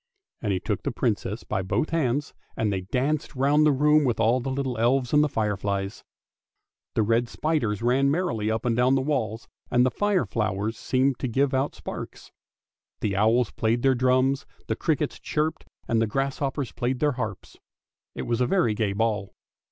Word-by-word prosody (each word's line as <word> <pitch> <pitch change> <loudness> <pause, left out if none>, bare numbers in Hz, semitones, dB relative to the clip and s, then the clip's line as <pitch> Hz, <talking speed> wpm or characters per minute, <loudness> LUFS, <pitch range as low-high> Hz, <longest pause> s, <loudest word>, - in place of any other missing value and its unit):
" - - -54
And 105 - -1
he 95 - 0
took - - -2
the - - -2
Princess - - -2
by 95 - -2
both 95 +12 -1
hands 145 -3 0 0.2
and 105 -2 +1
they 95 - -1
danced 135 +10 -1
round 145 +3 +4
the - - +5
room 150 +2 +4
with 120 -5 0
all 115 +3 +3
the 130 +2 -4
little 130 -1 -2
elves 125 +2 +2
and 150 0 +6
the 150 - +1
fireflies. 100 -4 -2 0.9
The 110 - +3
red 115 +2 +1
spiders 120 -10 -1
ran 130 +3 +3
merrily 130 - 0
up 110 +2 -1
and 120 -2 +2
down 125 +2 +3
the 135 - +2
walls, 115 -6 -2 0.2
and 125 0 +4
the 130 - +2
fire 205 - +1
flowers 105 0 -1
seemed 130 +2 0
to 130 - -1
give 135 +3 +1
out 135 +2 0
sparks. - - -8 0.7
The 100 -2 0
owls 110 +3 +3
played 115 +2 0
their 135 -1 +5
drums, 130 +2 +2 0.2
the - - -1
crickets - - -1
chirped, 155 +1 -2 0.2
and 115 -1 +2
the 115 - +2
grasshoppers 135 +2 -2
played 125 +2 -2
their 150 -1 +2
harps. 110 -7 -5 0.6
It - - -4
was 120 +1 -1
a 125 - +3
very 170 - +2
gay 105 -2 0
ball. 105 -2 -1
125 Hz, 190 wpm, -26 LUFS, 110-140 Hz, 0.9 s, and